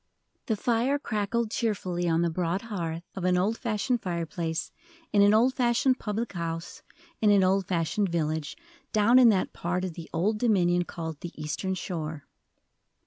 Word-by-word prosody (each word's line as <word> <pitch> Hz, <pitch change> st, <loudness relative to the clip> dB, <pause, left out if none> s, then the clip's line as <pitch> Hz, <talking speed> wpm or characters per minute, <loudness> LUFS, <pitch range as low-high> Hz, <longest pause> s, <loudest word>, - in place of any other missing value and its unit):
The 220 Hz, -, +1 dB
fire 240 Hz, +6 st, +1 dB
crackled 220 Hz, -2 st, -1 dB
cheerfully 185 Hz, -7 st, -1 dB
on 165 Hz, +1 st, +2 dB
the 170 Hz, -, +1 dB
broad 180 Hz, +3 st, -1 dB
hearth 170 Hz, -7 st, -4 dB
of 190 Hz, -, -5 dB
an 180 Hz, 0 st, +3 dB
old 200 Hz, +5 st, +1 dB
fashioned 235 Hz, +1 st, -1 dB
fireplace 170 Hz, -2 st, -3 dB, 0.4 s
in 205 Hz, -, +5 dB
an 200 Hz, 0 st, +6 dB
old 235 Hz, +5 st, +4 dB
fashioned 250 Hz, +1 st, +2 dB
public 215 Hz, +2 st, -3 dB
house 165 Hz, -1 st, -5 dB, 0.4 s
in 215 Hz, -, +4 dB
an 200 Hz, -2 st, +5 dB
old 190 Hz, 0 st, +2 dB
fashioned 180 Hz, +3 st, 0 dB
village, 155 Hz, -2 st, -2 dB, 0.3 s
down 225 Hz, +4 st, +5 dB
in 245 Hz, -2 st, +8 dB
that 195 Hz, -4 st, +1 dB
part 180 Hz, +2 st, -2 dB
of 180 Hz, -, -5 dB
the 165 Hz, 0 st, -9 dB
Old 205 Hz, +6 st, 0 dB
Dominion 180 Hz, -6 st, +2 dB
called 160 Hz, -3 st, -6 dB
the 170 Hz, -2 st, -9 dB
"Eastern 170 Hz, +5 st, -2 dB
Shore." 160 Hz, -5 st, -5 dB
185 Hz, 165 wpm, -27 LUFS, 170-220 Hz, 0.4 s, in